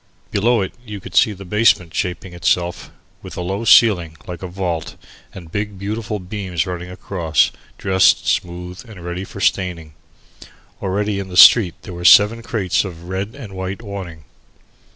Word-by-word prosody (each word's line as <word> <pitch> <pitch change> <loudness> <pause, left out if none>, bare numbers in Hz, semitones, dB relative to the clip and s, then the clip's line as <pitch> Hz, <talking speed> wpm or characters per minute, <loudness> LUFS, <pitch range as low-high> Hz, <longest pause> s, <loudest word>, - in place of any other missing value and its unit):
Below 115 +2 +2
it, 95 - -4
you 105 -4 -7
could 95 -2 -11
see 105 - +5
the 100 -1 -9
basement 90 -4 +2
shaping 90 0 -3
itself, 85 0 -1 0.3
with - - -10
a - - -3
low 95 +5 -3
ceiling 90 -8 +5
like 90 -2 -7
a 95 - -5
vault 90 -3 -4 0.4
and 85 -4 -12
big 105 0 -3
beams 100 -4 -4
running 90 -1 -6
across, 85 -4 0 0.3
dressed, 95 -2 +3
smoothed, 90 +4 -3
and 90 -5 -11
ready 90 +2 -4
for 100 - -10
staining. 90 -6 -1 0.9
Already 100 +1 -1
in 100 - -5
the 90 -1 -6
street 95 -4 +8
there 90 - -8
were 85 0 -7
seven 105 +5 +6
crates 105 -6 0
of 85 -3 -9
red 95 +5 -4
and 115 -9 -10
white 95 +4 -5
awning. 95 -6 -7
95 Hz, 160 wpm, -19 LUFS, 90-105 Hz, 0.9 s, street